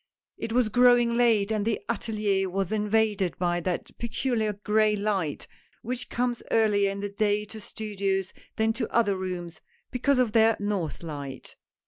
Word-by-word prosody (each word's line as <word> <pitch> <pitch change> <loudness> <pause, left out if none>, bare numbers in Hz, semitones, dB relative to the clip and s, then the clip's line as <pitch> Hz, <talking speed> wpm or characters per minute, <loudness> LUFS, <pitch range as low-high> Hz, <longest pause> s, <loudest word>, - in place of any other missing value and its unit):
It 225 - -5
was 240 -1 +2
growing 245 0 +5
late 225 -4 +3
and 215 -2 0
the 225 0 0
atSlier 210 -4 0
was 190 0 -2
invaded 210 -3 +1
by 175 -1 0
that 175 0 -3
peculiar 235 -2 -1
gray 210 +1 +2
light 200 -7 -1 0.4
which 250 +2 -4
comes 245 -1 -1
earlier 210 -3 +3
in 200 0 -4
the 205 - -3
day 210 0 0
to 220 +1 -10
studios 195 -3 -3 0.2
than 220 0 +1
to 245 - -3
other 215 -4 +2
rooms, 180 -3 -5 0.3
because 265 +2 +2
of 250 -4 +2
their 225 0 +4
north 200 -6 -2
light. 140 -4 -7
210 Hz, 155 wpm, -27 LUFS, 195-225 Hz, 0.4 s, growing